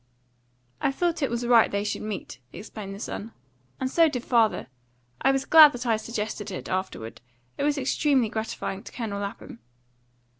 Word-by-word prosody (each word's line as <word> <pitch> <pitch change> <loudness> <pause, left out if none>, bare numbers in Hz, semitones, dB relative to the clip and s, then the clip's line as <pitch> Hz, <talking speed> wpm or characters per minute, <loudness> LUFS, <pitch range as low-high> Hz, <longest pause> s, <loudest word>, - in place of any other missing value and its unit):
"I - - +2
thought 340 +3 -1
it 275 - +1
was 235 +1 -2
right 235 -2 +5
they 200 0 -1
should 210 - -3
meet," 210 - -6
explained 195 +1 -8
the - - -10
son, 220 +1 -6 0.5
"and 260 - -1
so 325 +4 +4
did 250 -4 -4
father. 230 -3 +2 0.6
I 270 - +4
was 270 0 -1
glad 310 -2 +9
that 245 +1 -6
I 230 -2 +3
suggested 215 -2 -4
it, 185 - -6
afterward; 185 -12 -4 0.3
it - - -5
was 295 0 +1
extremely 270 -2 +2
gratifying 215 -3 -4
to - - -11
Colonel 215 -5 -4
Lapham." 200 -11 -7
230 Hz, 175 wpm, -26 LUFS, 205-270 Hz, 0.6 s, glad